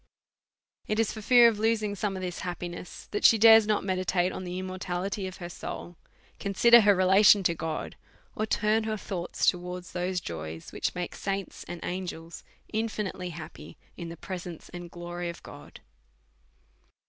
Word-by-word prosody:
It 215 Hz, -, 0 dB
is 225 Hz, -, +1 dB
for 220 Hz, -, -7 dB
fear 240 Hz, +2 st, +7 dB
of 220 Hz, -3 st, +1 dB
losing 220 Hz, -2 st, +1 dB
some 205 Hz, -1 st, -2 dB
of 185 Hz, -, -5 dB
this 180 Hz, -1 st, -4 dB
happiness 175 Hz, 0 st, -6 dB
that 205 Hz, -, -2 dB
she 225 Hz, -, +7 dB
dares 220 Hz, 0 st, +8 dB
not 210 Hz, -1 st, +1 dB
meditate 185 Hz, -1 st, 0 dB
on 185 Hz, -, -6 dB
the 180 Hz, 0 st, -5 dB
immortality 185 Hz, +1 st, -3 dB
of 185 Hz, -, -8 dB
her 175 Hz, -, -6 dB
soul, 175 Hz, 0 st, -7 dB, 0.4 s
consider 235 Hz, +4 st, +6 dB
her 205 Hz, -1 st, +5 dB
relation 190 Hz, +2 st, +6 dB
to 170 Hz, -, +2 dB
God, 160 Hz, -1 st, -4 dB, 0.4 s
or 215 Hz, -, -1 dB
turn 215 Hz, +1 st, +1 dB
her 220 Hz, -1 st, -2 dB
thoughts 180 Hz, -3 st, -3 dB
to 180 Hz, -, -1 dB
wards 180 Hz, 0 st, -7 dB
those 180 Hz, +1 st, -1 dB
joys 80 Hz, -, -7 dB
which -, -, -2 dB
make 180 Hz, 0 st, -4 dB
saints 195 Hz, -1 st, -4 dB
and 175 Hz, -, -6 dB
angels 175 Hz, -2 st, -5 dB, 0.3 s
infi 215 Hz, -2 st, -1 dB
nitely 180 Hz, -1 st, -6 dB
happy 160 Hz, 0 st, -10 dB, 0.2 s
in 170 Hz, -2 st, -7 dB
the 170 Hz, -, -8 dB
presence 175 Hz, -2 st, -7 dB
and 175 Hz, -1 st, -8 dB
glory 175 Hz, 0 st, -5 dB
of 170 Hz, -, -9 dB
God. -, -, -12 dB
185 Hz, 170 wpm, -28 LUFS, 175-210 Hz, 0.4 s, dares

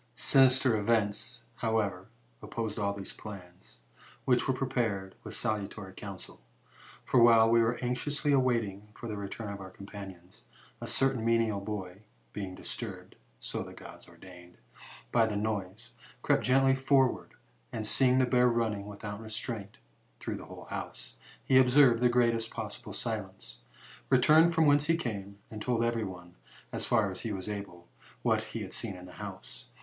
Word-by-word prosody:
"Sinister 130 Hz, -2 st, +5 dB
event, 110 Hz, +2 st, 0 dB
however, 105 Hz, -5 st, -1 dB, 0.3 s
opposed 110 Hz, -3 st, -4 dB
all 100 Hz, -1 st, +1 dB
these 100 Hz, -1 st, -7 dB
plans, 90 Hz, -, -11 dB, 0.4 s
which 125 Hz, -2 st, +3 dB
were 135 Hz, -, +3 dB
prepared 115 Hz, -8 st, -1 dB
with -, -, -5 dB
salutary 105 Hz, -3 st, -3 dB
counsel. 95 Hz, -8 st, -8 dB, 0.6 s
For, 125 Hz, -, +4 dB
while 115 Hz, -1 st, +7 dB
we 115 Hz, 0 st, +6 dB
were 115 Hz, +1 st, +1 dB
anxiously 145 Hz, +4 st, 0 dB
waiting 115 Hz, -6 st, +1 dB
for 120 Hz, -, -7 dB
the 105 Hz, -, -4 dB
return 100 Hz, +1 st, -5 dB
ot 100 Hz, -, -8 dB
our 95 Hz, -1 st, -8 dB
companions, 95 Hz, -2 st, -11 dB, 0.4 s
a -, -, -5 dB
certain 135 Hz, -4 st, +1 dB
menial 115 Hz, -3 st, +2 dB
boy, 100 Hz, -2 st, -5 dB, 0.3 s
being 95 Hz, -2 st, -5 dB
disturbed -, -, -7 dB, 0.2 s
(so -, -, -4 dB
the -, -, -8 dB
Gods -, -, -12 dB
ordained) 90 Hz, -1 st, -14 dB, 0.5 s
by 115 Hz, -1 st, +4 dB
the 105 Hz, -2 st, -2 dB
noise, 105 Hz, +1 st, -3 dB, 0.3 s
crept -, -, +3 dB
gently 135 Hz, +1 st, +4 dB
forward, 135 Hz, -1 st, +2 dB, 0.4 s
and 110 Hz, -, -3 dB
seeing 130 Hz, +3 st, +4 dB
the 130 Hz, -, +5 dB
bear 125 Hz, 0 st, +4 dB
running, 110 Hz, -4 st, 0 dB
without 105 Hz, +1 st, -7 dB
restraint, 110 Hz, -2 st, -5 dB, 0.4 s
through -, -, -4 dB
the -, -, -9 dB
whole -, -, -10 dB
house, 60 Hz, 0 st, -6 dB, 0.3 s
he 130 Hz, -, +6 dB
observed 125 Hz, -2 st, +6 dB
the 125 Hz, -, +5 dB
greatest 115 Hz, -2 st, +2 dB
possible -, -, -6 dB
silence, -, -, -5 dB, 0.5 s
returned 155 Hz, +6 st, +6 dB
from 160 Hz, -1 st, +4 dB
whence 145 Hz, 0 st, +4 dB
he 165 Hz, 0 st, +3 dB
came^ 100 Hz, -, -4 dB, 0.2 s
and 110 Hz, -1 st, -7 dB
told 120 Hz, -1 st, 0 dB
to 115 Hz, -, +3 dB
every 115 Hz, -1 st, 0 dB
one, 90 Hz, -2 st, -9 dB, 0.4 s
as -, -, -3 dB
far 110 Hz, -5 st, +2 dB
as 95 Hz, -, -4 dB
he 115 Hz, -, -3 dB
was 95 Hz, -1 st, -4 dB
able, 100 Hz, -4 st, -6 dB, 0.4 s
what -, -, +2 dB
he -, -, -6 dB
had -, -, -8 dB
seen 95 Hz, -, -2 dB
in 90 Hz, 0 st, -10 dB
the 90 Hz, -, -12 dB
house. -, -, -9 dB
110 Hz, 165 wpm, -30 LUFS, 100-125 Hz, 0.6 s, while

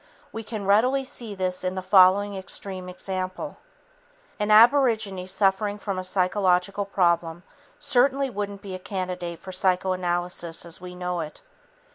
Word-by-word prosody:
We 225 Hz, -, -5 dB
can 215 Hz, -2 st, -6 dB
readily 250 Hz, +7 st, +3 dB
see 235 Hz, -5 st, -4 dB
this 185 Hz, -1 st, -2 dB
in 185 Hz, 0 st, -2 dB
the 185 Hz, -, -4 dB
following 195 Hz, +1 st, +5 dB
extreme 190 Hz, -1 st, -6 dB
example: 185 Hz, +8 st, -5 dB, 0.8 s
An 210 Hz, 0 st, -1 dB
aborigine 220 Hz, -5 st, +4 dB
suffering 200 Hz, +2 st, +1 dB
from 200 Hz, -2 st, -4 dB
a -, -, -4 dB
psychological 185 Hz, +1 st, +1 dB
problem 175 Hz, -3 st, 0 dB, 0.4 s
certainly 270 Hz, +2 st, +2 dB
wouldn't 205 Hz, -4 st, -5 dB
be 195 Hz, -2 st, -7 dB
a 185 Hz, -, -5 dB
candidate 180 Hz, -3 st, -4 dB
for 185 Hz, -, -9 dB
psychoanalysis 180 Hz, -2 st, -1 dB
as 170 Hz, 0 st, -6 dB
we 180 Hz, 0 st, -9 dB
know 180 Hz, -1 st, -3 dB
it. 155 Hz, -2 st, -6 dB
190 Hz, 140 wpm, -25 LUFS, 180-205 Hz, 0.8 s, following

